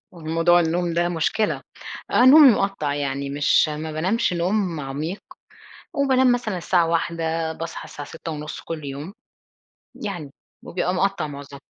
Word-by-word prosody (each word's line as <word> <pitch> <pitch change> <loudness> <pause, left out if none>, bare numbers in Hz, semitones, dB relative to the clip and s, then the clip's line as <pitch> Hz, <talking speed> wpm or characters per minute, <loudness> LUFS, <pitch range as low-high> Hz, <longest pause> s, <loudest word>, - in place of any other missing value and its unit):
موضوع 165 +1 +2
النوم 170 +1 0
ده 175 +1 +1
مشكلة. 175 +5 0 0.5
آه، 245 - +4
نومي 285 +1 +9
مقطَّع 195 -9 -1
يعني 140 -1 -3
مش 145 +2 +3
ما 155 +1 -5
بانامش 185 +8 0
نوم 180 -1 0
عميق، 150 +8 -4 0.7
وبانام 260 -2 +3
مثلًا 225 -6 -1
الساعة 170 0 +2
01:00 165 -1 -1
باصحى 165 +1 -6
الساعة 145 - -9
06:30 155 -2 -7
كل 155 -3 -6
يوم. 145 +7 -6 0.8
يعني، 180 - -6 0.3
وبيبقى 180 0 -2
مقطَّع 190 -3 0
معظمة. 140 -1 -9
165 Hz, 135 wpm, -23 LUFS, 150-190 Hz, 0.8 s, نومي